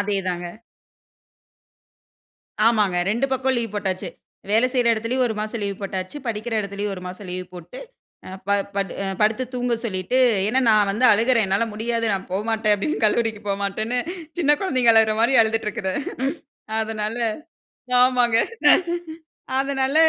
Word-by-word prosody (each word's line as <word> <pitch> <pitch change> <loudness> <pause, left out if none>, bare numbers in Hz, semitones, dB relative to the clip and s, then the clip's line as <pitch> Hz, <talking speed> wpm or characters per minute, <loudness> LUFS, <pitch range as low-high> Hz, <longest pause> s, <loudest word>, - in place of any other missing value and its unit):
அதேதாங்க. 185 -3 -2 2.2
ஆமாங்க. 210 -5 +3
ரெண்டு 235 +6 +1
பக்கம் 265 0 +1
லீவ் 230 -3 -3
போட்டாச்சு. 190 -3 -2 0.4
வேல 225 +4 +4
செய்ற 245 -2 +2
இடத்துலேயும் 230 +4 0
ஒரு 220 - -3
மாசம் 215 +2 -4
லீவ் 200 -1 -3
போட்டாச்சு, 190 +4 -4
படிக்கிற 225 +1 -3
இடத்துலேயும் 200 0 -4
ஒரு 180 - -9
மாசம் 185 +2 -9
லீவு 180 0 -4
போட்டு. 175 -1 -10 0.5
அ - - -8 0.2
ப - - 0 0.2
படு 200 -1 -1 0.3
படுத்து 220 +4 +2
தூங்கச் 245 -1 -1
சொல்லிட்டு. 190 +3 -1 0.3
ஏனா, 255 +4 +2
நான் 210 -2 +4
வந்து 215 +6 0
அழுகுறேன் 230 +2 +3
என்னால 195 +4 +1
முடியாது 230 +2 -1
நான் 195 -1 -3
போமாட்டேன் 215 +2 +1
அப்டின்னு 205 +7 -2
கல்லூரிக்கு 220 0 +1
போமாட்டேன்னு 200 +4 -1 0.4
சின்ன 300 -4 +3
குழந்தைங்க 255 -11 +3
அழகுற 220 -1 +4
மாரி 235 +3 +3
அழுதுட்டு 225 0 +1
இருக்குது. 190 -2 -3 0.9
அதனால, 220 0 -3 0.8
ஆமாங்க. 250 -2 +4 1.2
அதுனால 270 0 0
220 Hz, 135 wpm, -22 LUFS, 200-240 Hz, 2.2 s, வேல